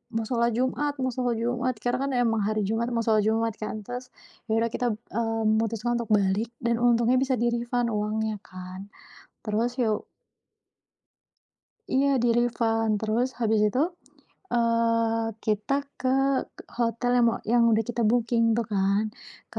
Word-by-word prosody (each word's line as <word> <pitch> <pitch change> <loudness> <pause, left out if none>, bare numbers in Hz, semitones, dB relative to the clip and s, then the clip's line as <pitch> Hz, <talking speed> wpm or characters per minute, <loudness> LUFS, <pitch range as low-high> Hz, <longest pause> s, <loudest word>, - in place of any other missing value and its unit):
mau 225 0 0
sholat 235 -1 +1
Jumat, 280 +3 0
mau 260 0 0
sholat 245 -1 -1
Jumat. 245 +1 -1
Karena 245 +1 0
kan - - -3
emang 225 -3 +2
hari 215 0 0
Jumat, 230 +2 -1
mau 230 -1 0
sholat 215 -2 +3
Jumat 225 0 +1
kan 215 0 -4
terus 250 +1 -6 0.4
ya 220 - +2
udah 230 0 +1
kita, 240 -3 0 0.2
eee, 225 0 -1
memutuskan 225 +2 +1
untuk 235 - -5
balik 205 +2 +2
dan 235 0 +1
untungnya 240 +1 +4
bisa 265 -1 +1
di 240 +1 +2
refund 240 0 -1
uangnya 215 +1 -1
kan. 185 +2 -9 0.6
Terus 230 +3 0
ya 230 -3 +2
u - - -13 1.9
Iya 275 +2 +3
di-refund. 230 -2 +1
Terus 225 +3 +1
habis 220 -1 +2
itu, 210 +5 +1 0.7
eee, 230 -1 +2 0.2
kita 210 +4 0 0.2
ke 255 - -2 0.7
hotel 235 +1 0
yang 240 - +4
mo 230 - +1
yang 240 0 +4
udah 220 - +4
kita 235 0 -2
booking 235 +1 +2
tuh 235 - 0
kan 200 +1 +2 0.5
ke - - -5
230 Hz, 155 wpm, -26 LUFS, 220-240 Hz, 1.9 s, untungnya